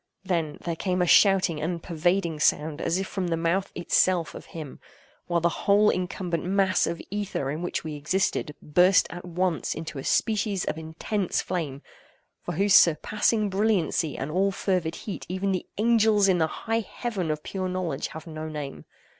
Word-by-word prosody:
—then, 165 -6 -1
there 170 -1 -3
came 185 +2 -1
a 180 - +3
shouting 185 -4 +4
and 170 +1 -3
pervading 170 -1 0
sound, 155 0 +1
as 170 - 0
if 190 - -1
from 190 -1 -3
the 165 -1 0
mouth 170 +4 0
itself 175 0 +2
of - - -10
HIM; 155 -5 -8 0.5
while 175 -1 +1
the 170 0 -1
whole 210 +1 +6
incumbent 180 -2 -3
mass 190 0 +2
of 170 - -3
ether 195 -9 -2
in 155 +3 -4
which 175 - -3
we 155 -1 -5
existed, 150 0 -1
burst 180 +5 +4
at 175 +1 -7
once 180 -1 -1
into 160 -3 -6
a - - -6
species 210 -1 +1
of - - -2
intense 165 +5 -2
flame, 150 -6 -4 0.6
for - - -5
whose 200 +4 +2
surpassing 210 +6 +4
brilliancy 190 -6 0
and 140 +3 -4
all 195 +4 +2
fervid 180 -4 -1
heat 205 - -6
even 190 +2 -1
the 185 - -2
angels 220 -2 +4
in 185 -2 +3
the 160 - +3
high 225 +7 -2
Heaven 215 -5 -4
of 150 0 -2
pure 185 -1 -3
knowledge 180 -6 -2
have 160 - -9
no 155 -1 -6
name. 150 -3 -6
180 Hz, 180 wpm, -26 LUFS, 160-195 Hz, 0.6 s, whole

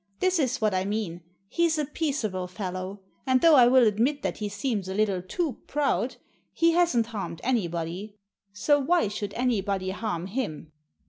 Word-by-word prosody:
This 370 -2 +2
is 275 -1 0
what 215 -2 +1
I 185 0 +1
mean: 200 -4 -3 0.3
He's 335 - +1
a 300 - 0
peaceable 255 - -2
fellow. 185 +1 -5 0.3
And 260 0 +4
though 330 -1 +7
I 250 -4 +8
will 255 0 +6
admit 235 +8 +1
that - - -2
he 210 -1 -2
seems 205 -2 -2
a 190 - -3
little 200 -3 +1
too 280 - -3
proud, 275 -3 0 0.4
he 335 0 +3
hasn't 335 -9 +3
harmed 205 -7 -5
anybody. 185 -3 -2 0.4
So 290 +8 +2
why 285 - +2
should 205 -1 -5
anybody 200 -6 0
harm 185 -4 -3
him?" 190 - -4
215 Hz, 170 wpm, -27 LUFS, 190-270 Hz, 0.4 s, I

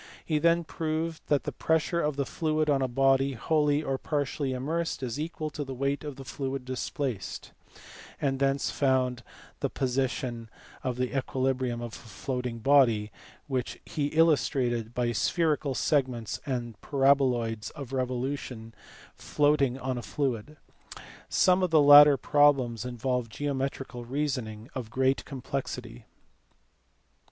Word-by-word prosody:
He 155 -2 +1
then 170 +2 +3
proved 160 +1 -3
that 145 -2 +2
the - - -3
pressure 160 +2 0
of 150 -1 0
the 140 0 -1
fluid 155 +1 0
on 135 -1 +2
a 130 - +1
body, 135 +2 +2
wholly 150 +3 +1
or 135 -2 -2
partially 145 -1 -2
immersed, 150 +4 -2
is 125 +2 -3
equal 155 -1 -4
to 145 - -4
the 135 -1 -6
weight 140 +2 -1
of 145 -2 -6
the 135 - -10
fluid 135 0 -4
displaced; 130 - -4 0.7
and 135 -2 0
thence 135 0 +1
found 130 -3 +1 0.4
the - - -1
position 125 -3 -2 0.3
of 125 -1 -2
equilibrium 130 -1 -1
of 120 -2 -6
a - - -7
floating 125 +1 -5
body, 115 -5 +3 0.3
which 130 -3 -3
he 145 -2 -2
illustrated 130 -7 +1
by 120 -1 +1
spherical 150 +2 0
segments 125 -8 0
and 120 -5 -4
paraboloids 130 -6 +2
of 140 -4 -8
revolution 125 -3 -3 0.4
floating 145 -3 +1
on 130 -1 -3
a - - -5
fluid. 135 +3 -3 0.7
Some 185 0 +4
of 185 - +2
the 160 -2 +5
latter 145 0 +9
problems 135 -7 +3
involve 125 -1 -2
geometrical 135 -1 -3
reason 135 -1 -2
ing 110 +2 -10
of 125 -4 -5
great 130 +3 +1
complexity. 125 -3 -5
135 Hz, 135 wpm, -28 LUFS, 125-145 Hz, 0.7 s, latter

